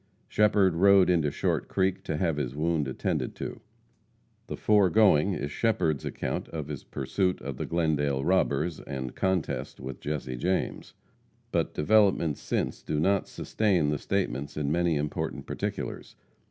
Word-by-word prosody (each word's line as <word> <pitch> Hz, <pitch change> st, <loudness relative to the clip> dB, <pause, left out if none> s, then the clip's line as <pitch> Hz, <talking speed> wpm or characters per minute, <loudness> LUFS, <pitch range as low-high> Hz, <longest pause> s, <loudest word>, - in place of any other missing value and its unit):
Shepherd 105 Hz, -3 st, +3 dB
rode 100 Hz, 0 st, +6 dB
into 80 Hz, -4 st, +2 dB
Short -, -, -1 dB
Creek 95 Hz, -1 st, 0 dB
to 80 Hz, -, -2 dB
have 80 Hz, -3 st, 0 dB
his 65 Hz, -3 st, -3 dB
wound 80 Hz, -1 st, 0 dB
attended 65 Hz, -, -2 dB
to. -, -, -6 dB, 0.9 s
The -, -, -5 dB
foregoing 100 Hz, -3 st, +4 dB
is 70 Hz, -, -4 dB
Shepherd's 85 Hz, -, 0 dB
account -, -, -3 dB
of 75 Hz, -3 st, -5 dB
his 70 Hz, -4 st, -5 dB
pursuit 90 Hz, +7 st, -1 dB
of -, -, -5 dB
the -, -, -4 dB
Glendale 75 Hz, -5 st, 0 dB
robbers 90 Hz, -2 st, +1 dB
and 65 Hz, -3 st, -5 dB
contest 95 Hz, -3 st, -2 dB
with 65 Hz, -1 st, -7 dB
Jesse 70 Hz, -4 st, -4 dB
James. 90 Hz, +9 st, -2 dB, 0.6 s
But -, -, -1 dB
developments 95 Hz, -4 st, +3 dB
since -, -, -2 dB
do 75 Hz, -, -2 dB
not 95 Hz, +4 st, +2 dB
sustain 95 Hz, -9 st, 0 dB
the 75 Hz, -, -1 dB
statements 65 Hz, +5 st, -2 dB
in 70 Hz, -1 st, -1 dB
many 85 Hz, 0 st, +2 dB
important 75 Hz, 0 st, -3 dB
particulars. -, -, -5 dB
80 Hz, 145 wpm, -28 LUFS, 75-95 Hz, 0.9 s, rode